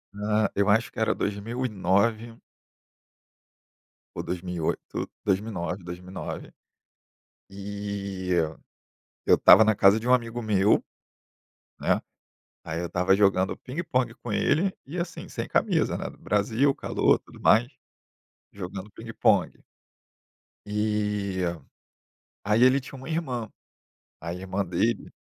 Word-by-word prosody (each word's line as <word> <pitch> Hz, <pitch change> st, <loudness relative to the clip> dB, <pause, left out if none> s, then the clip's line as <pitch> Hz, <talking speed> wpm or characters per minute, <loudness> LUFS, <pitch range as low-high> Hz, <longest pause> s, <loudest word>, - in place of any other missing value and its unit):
Ah. 105 Hz, 0 st, +1 dB
Eu 100 Hz, 0 st, +2 dB
acho 110 Hz, +4 st, +3 dB
que -, -, -8 dB
era 110 Hz, -, +2 dB
2009. 110 Hz, +1 st, -1 dB, 1.8 s
ou -, -, -4 dB
2008, 90 Hz, -2 st, -3 dB, 0.2 s
2009- 95 Hz, -3 st, -1 dB
2009, 90 Hz, +2 st, -7 dB, 1.0 s
e 100 Hz, -1 st, -5 dB, 1.0 s
eu -, -, +5 dB
estava 110 Hz, -, +8 dB
na 110 Hz, 0 st, +3 dB
casa 100 Hz, +3 st, +5 dB
de 115 Hz, -, -7 dB
um 125 Hz, -, +5 dB
amigo 120 Hz, -1 st, -2 dB
meu, 105 Hz, -1 st, +3 dB, 1.0 s
né, -, -, +1 dB, 0.6 s
aí 80 Hz, +2 st, -3 dB
eu 90 Hz, -, -2 dB
estava 90 Hz, +3 st, +2 dB
jogando 95 Hz, -2 st, +2 dB
pingue-pongue 130 Hz, -5 st, -2 dB
com 120 Hz, -, -8 dB
ele 170 Hz, -, +2 dB
e 170 Hz, +6 st, -6 dB
assim, 175 Hz, +1 st, -5 dB
sem -, -, -4 dB
camisa, -, -, +1 dB
né, -, -, -4 dB
no -, -, -17 dB
Brasil, 115 Hz, +7 st, +1 dB
calor, -, -, +2 dB
tudo -, -, -16 dB
mais, 115 Hz, +3 st, +5 dB, 0.9 s
jogando 95 Hz, +1 st, -7 dB
pingue-pongue -, -, 0 dB, 1.0 s
e, 105 Hz, -2 st, -1 dB, 1.0 s
aí 105 Hz, +4 st, +2 dB
ele 130 Hz, +2 st, +6 dB
tinha 135 Hz, -, -10 dB
uma 130 Hz, +2 st, -9 dB
irmã, 130 Hz, -9 st, -3 dB, 0.7 s
a 85 Hz, +1 st, -5 dB
irmã 95 Hz, +2 st, -3 dB
dele 95 Hz, +5 st, -1 dB
105 Hz, 115 wpm, -26 LUFS, 95-115 Hz, 1.8 s, estava